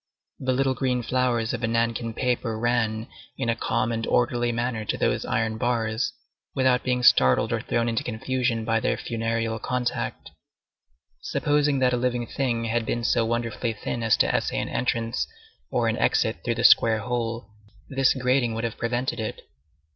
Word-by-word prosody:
The 130 0 0
little 135 +1 +2
green 125 -2 -1
flowers 120 -2 0
of 120 - -3
the 115 - 0
nankin 115 0 -1
paper 120 -3 -1
ran 110 -1 0 0.3
in 115 - -1
a 115 - +2
calm 115 0 0
and 115 -1 -2
orderly 120 0 +1
manner 120 -1 -2
to - - -2
those - - 0
iron 110 0 -1
bars, 115 -2 0 0.4
without 130 -1 +3
being 125 -1 -1
startled 65 - +5
or - - -1
thrown 115 0 0
into 115 -1 -1
confusion 120 0 -1
by 115 -1 +2
their - - 0
funereal 115 0 -2
contact. 125 0 -3 0.9
Supposing 145 -1 +1
that 130 -1 +2
a - - +2
living 120 -1 -1
being 120 -4 0
had 115 +1 0
been 120 +1 -2
so 115 -1 +2
wonderfully 115 0 -1
thin 115 +2 -4
as 115 -2 +3
to - - +2
essay - - 0
an - - -3
entrance 115 -2 -1 0.4
or - - +1
an - - 0
exit - - +2
through - - 0
the - - -2
square 110 -1 +6
hole, 115 -2 -3 0.4
this 135 0 +2
grating 125 -2 +1
would 115 - -3
have 115 -2 -3
prevented 120 +1 -1
it. 110 - -4
120 Hz, 175 wpm, -25 LUFS, 115-125 Hz, 0.9 s, square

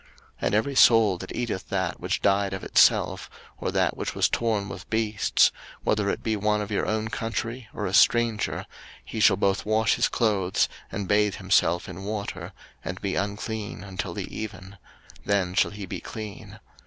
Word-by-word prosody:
03:017:015 - - -26 0.3
And 100 - +1
every 125 +6 +1
soul 115 -7 +6
that - - -7
eateth 120 -6 -3
that 95 -3 -1
which 90 +2 -2
died 100 -1 +2
of 95 - -5
itself, - - +3 0.3
or - - -2
that - - +1
which - - -4
was - - +3
torn 110 -4 0
with 90 - -9
beasts, 110 -2 +2 0.3
whether 105 -2 +1
it - - -3
be 110 -1 0
one 105 +1 +1
of 105 0 -4
your 100 - 0
own 110 0 -1
country, 115 +2 -4
or 105 - -4
a 95 - -3
stranger, 115 0 +3 0.4
he - - -5
shall - - +5
both 95 0 +1
wash 110 +2 +2
his 120 - +3
clothes, 100 -5 +1 0.2
and 95 0 -4
bathe 105 0 +2
himself 90 -3 +2
in 90 +1 -8
water, 105 0 -4 0.3
and 90 +3 -5
be 100 -2 -2
unclean 100 +1 -3
until 95 -2 -5
the - - -3
even: 100 -3 -7 0.4
then 95 -3 0
shall - - +3
he 100 -1 -7
be 95 0 -5
clean. 105 +3 -8
100 Hz, 180 wpm, -26 LUFS, 95-110 Hz, 0.4 s, soul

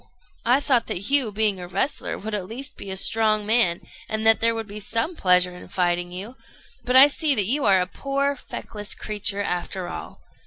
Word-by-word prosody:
I 250 +4 +4
thought 250 -5 +1
that 200 +8 -3
you, 275 -6 +3
being 205 -2 0
a 180 - -7
wrestler, 265 +10 -2
would 215 +2 -6
at 195 -3 -3
least 265 +7 -7
be 195 - -9
a 190 - -1
strong 215 +1 +3
man, 215 -6 +2 0.3
and 220 0 -2
that 225 0 +6
there 230 0 +2
would 225 0 -4
be 210 0 -9
some 230 - -2
pleasure 180 - +2
in 180 - -12
fighting 175 -1 -1
you; 205 +8 -8 0.5
but 250 - -1
I 265 +2 +10
see 290 0 +2
that 205 -4 +2
you 275 +8 0
are 190 -2 +4
but 185 - -24
a - - -16
poor 280 +1 0
feckless 210 -5 -6
creature, 205 -1 -2
after 180 0 -3
all. 80 0 -8
215 Hz, 210 wpm, -23 LUFS, 185-245 Hz, 0.5 s, I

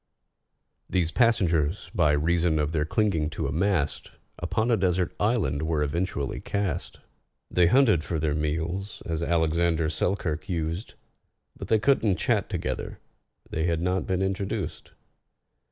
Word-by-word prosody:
These 85 -3 +1
passengers, 90 - +2
by 75 -5 +3
reason 80 +2 +2
of 75 0 0
their 75 -2 0
clinging 80 -5 +1
to 80 - -1
a 70 - -1
mast, 85 -1 0 0.3
Upon 110 +8 0
a - - +5
desert 90 -3 0
island 100 - +1
were 80 -1 0
eventually 75 -2 -2
cast. 100 -5 -3 0.5
They 90 -1 +4
hunted 110 - +4
for 85 - -2
their 75 -1 0
meals, 80 +6 -3
as 80 -1 -2
ALEXANDER 80 -1 +1
SELKIRK 90 -1 -2
used, 85 +3 -3 0.6
But - - -7
they 110 - +4
couldn't 110 -4 +3
chat - - 0
together—they 80 +1 -5
had 85 -1 0
not 90 +1 0
been 95 0 0
introduced. 95 0 -3
85 Hz, 135 wpm, -26 LUFS, 80-95 Hz, 0.6 s, a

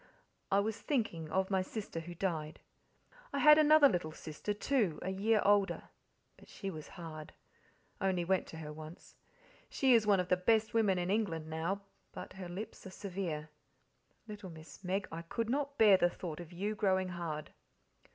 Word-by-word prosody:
I 195 - +5
was 215 +1 -3
thinking, 215 - -1
of 190 +4 0
my 190 -1 +3
sister 190 -2 -5
who 175 +1 -8
died. 160 -4 -2 0.7
I - - -2
had 300 +2 +8
another 305 -1 +7
little 170 - -1
sister, 155 +5 -5
too, 205 - +1
a 190 - -2
year 210 +3 +2
older, 200 -1 +2 0.5
but - - -17
she 195 - -5
was 155 -3 -8
hard 155 -3 -8 0.7
only 190 -3 +1
event 190 +2 +1
to 160 - -9
her 150 -1 -7
once. 155 +2 -11 0.5
She 265 -2 +3
is 225 -3 +4
one 200 -2 +5
of 180 0 -1
the 180 - +4
best 220 +4 +2
women 210 -5 +3
in 180 +1 -1
England 175 -7 -1
now, 170 +5 -2 0.3
but - - -8
her 185 -2 -7
lips 200 +5 -7
are - - -7
severe. 180 -6 -4 0.8
Little 205 -3 -8
Miss 160 0 -12
Meg, 190 +2 -1
I 165 +1 -5
could 225 +7 -3
not 285 +1 -1
bear 210 -4 +7
the 175 - +3
thought 170 -2 -6
of 170 -1 -9
you 200 +5 -2
growing 190 -3 +1
hard." 165 -4 -5
190 Hz, 180 wpm, -34 LUFS, 165-210 Hz, 0.8 s, had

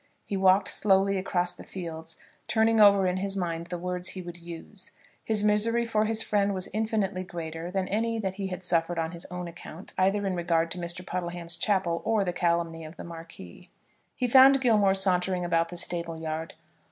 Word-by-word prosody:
He 200 - -3
walked 190 0 +4
slowly 195 -1 +2
across 180 -1 -1
the - - -12
fields, 165 -3 -7 0.3
turning 225 0 +3
over 200 -2 +7
in 180 0 +1
his 195 +1 -2
own - - 0
mind 170 -1 -3
the 175 0 -4
words 180 0 -3
he 185 - -6
would 175 0 -8
use. 170 +3 -8 0.3
His 215 -2 +1
misery 225 +3 +2
for 220 -2 +1
his 225 0 0
friend 200 -1 +1
was 185 0 -3
infinitely 210 -3 -1
greater 165 -2 -6
than 185 0 -1
any 230 +3 0
that 195 -4 -2
he 195 0 -4
had 185 0 -6
suffered 175 -1 +1
on 165 0 -1
his 170 -1 -6
own 180 -1 -5
account, 170 +1 -10
either 195 +2 +2
in 190 - 0
regard 170 -1 +1
to 180 - -4
Mr. 175 +1 -3
Puddleham's 175 -1 -3
chapel 175 -2 0
or 220 -2 +2
the 180 -2 -2
calumny 170 -2 0
of 155 +2 -10
the - - -7
Marquis. 165 - -11 0.5
He 250 - 0
found 270 +2 +7
Gilmore 210 -6 +4
sauntering 185 -1 +1
about 165 -1 +1
the 175 - -7
stable 170 -1 0
yard. 160 0 -4
180 Hz, 200 wpm, -27 LUFS, 170-200 Hz, 0.5 s, over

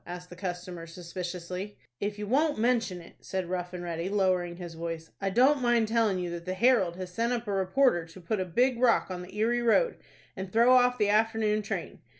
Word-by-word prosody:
asked 180 0 -9
the - - -8
customer, 180 -2 -6
suspiciously. 180 +3 -6 0.2
"If 205 +1 -3
you 210 - -4
won't 290 +7 +2
mention 225 -6 +1
it," 170 - -16
said 190 -2 -3
Rough 180 0 -3
and 180 -1 -6
Ready, 170 +1 -3
lowering 185 -3 +1
his 175 -1 -8
voice, 165 0 -6
"I 195 - 0
don't 260 +7 +4
mind 240 -2 +3
telling 225 -4 +2
you 180 -1 -3
that 170 0 -6
the 185 0 -3
'Herald' 195 -5 +3
has 185 0 -7
sent 230 +4 0
up 240 -1 -3
a - - -1
reporter 190 0 +2
to 165 +3 -13
put 190 +4 -2
a 185 - -1
big 245 +7 +1
rock 240 -6 +3
on 180 -1 -4
the 185 +3 -10
Erie 235 +3 +2
Road, 240 - +3 0.4
and 190 -1 -6
throw 235 +4 +5
off 250 0 +4
the 210 -3 +2
afternoon 215 0 +2
train. 205 - -5
190 Hz, 215 wpm, -29 LUFS, 180-230 Hz, 0.4 s, throw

